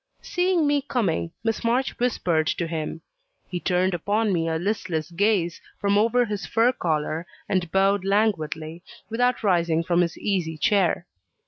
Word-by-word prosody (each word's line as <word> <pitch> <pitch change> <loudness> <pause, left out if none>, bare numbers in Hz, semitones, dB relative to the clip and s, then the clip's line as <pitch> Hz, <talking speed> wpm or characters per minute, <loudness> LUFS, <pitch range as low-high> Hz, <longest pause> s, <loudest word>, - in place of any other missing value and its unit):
Seeing 360 -2 +1
me 290 -1 +2
coming, 225 - -1
Miss 225 -1 -1
March 245 +3 0
whispered 175 -10 +1
to 170 - 0
him; 160 0 -4 0.5
he 180 - -4
turned 180 +1 +1
upon 205 +5 0
me 165 -2 0
a 160 - 0
listless 175 -4 -2
gaze 180 -2 +1 0.2
from 200 -1 +1
over 230 +4 +3
his 205 -3 -4
fur 230 +3 +3
collar, 160 -4 -2 0.2
and 180 -4 -1
bowed 195 0 +3
languidly, 170 -6 0 0.3
without 245 +1 +1
rising 170 -4 +2
from 175 0 +2
his 170 -1 -1
easy 175 -6 -1
chair. 180 +1 +2
190 Hz, 150 wpm, -24 LUFS, 165-220 Hz, 0.5 s, over